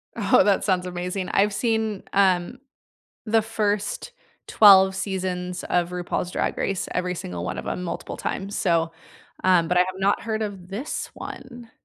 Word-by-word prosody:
Oh, 200 -5 +4
that 200 0 +2
sounds 185 -2 +1
amazing 180 +1 -4
I've 205 +1 +2
seen, 220 -2 -1
um, 190 +4 +2 0.7
the 220 +1 +3
first 210 -2 -2 0.4
12 190 -2 +7
seasons 185 -2 -3
of 175 -1 0
RuPaul's 180 0 -3
Drag - - -1
Race, 195 -2 -2
every 180 0 -1
single 90 - -5
one - - -4
of - - -6
'em 180 - -3
multiple 175 - -5
times, 195 +2 -4
so, 165 -3 +1 0.5
um, 180 -3 +4
but 180 - +1
I - - +6
have 185 +1 0
not 195 +1 +1
heard 220 0 -2
of 195 -4 -6
this 220 +10 -5
one. 240 -3 -9
190 Hz, 160 wpm, -24 LUFS, 180-210 Hz, 0.7 s, 12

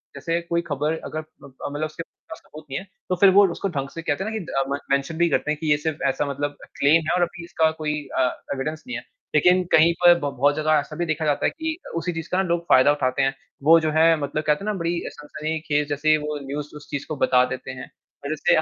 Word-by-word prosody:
जैसे 165 0 -1
कोई 170 0 -1
खबर 150 +1 -1
अगर 155 - -4 0.2
म - - -10
अ, 135 - -19 0.2
मतलब 145 +2 -2
उसके 155 +2 -6
पास 160 - -13
सबूत 155 0 -13
नहीं 135 - -2
है, 190 - -11 0.2
तो 185 - +2
फ़िर 195 +2 +6
वो 200 - +7
उसको 195 - -3
ढंग 140 -5 -3
से 165 - -7
कहते 155 +2 -1
हैं 215 - -3
ना 220 - -3
कि 215 - -5
द - - -10
अ, - - +2
में 140 - 0
मेंशन 140 +4 0
भी 170 0 +3
करते 150 - 0
हैं 155 - -1
कि 155 -2 0
ये 145 - +5
सिर्फ 155 +1 -3
ऐसा 145 - -1
मतलब 145 +1 -3
अ, - - -10
क्लेम 155 +4 +5
है - - +2
और 180 - +1
अभी 175 0 -4
इसका 160 -2 +2
कोई 150 -1 -1 0.2
अ, 130 -1 +4 0.2
एविडेंस 155 +3 -4
नहीं 125 -1 -3
है। 120 - -8 0.3
लेकिन 180 +4 +5
कहीं 165 +2 +6
पर 175 - +10
ब 145 - -2
बहुत 145 +3 +3
जगह 155 0 0
ऐसा 145 - -6
भी 175 - -1
देखा 155 0 -1
जाता 145 -1 +1
है - - +4
कि 320 0 -3 0.2
उसी 170 +2 -1
चीज़ 165 0 -5
का 180 - +1
ना - - 0
लोग 170 0 +1
फ़ायदा 130 +3 +6
उठाते 135 -2 0
हैं, 135 0 +2 0.3
वो 165 +3 +7
जो 155 -1 -1
है 165 +1 +5
मतलब 145 +2 -2
कहते 150 +5 +2
हैं - - -5
ना - - -2
बड़ी 170 +1 0 0.2
सनसनीख़ेज़ 150 0 -3
जैसे 145 +2 0
ही 155 - +6
वो 150 0 -4
न्यूज़ 145 +2 -5
उस 150 - -11
चीज़ 145 -2 -4
को 155 - -3
बता 125 -1 +5
देते 130 0 -6
हैं। 130 0 -8 0.4
और - - -3
जैसे 155 - +2
155 Hz, 275 wpm, -23 LUFS, 145-165 Hz, 0.4 s, पर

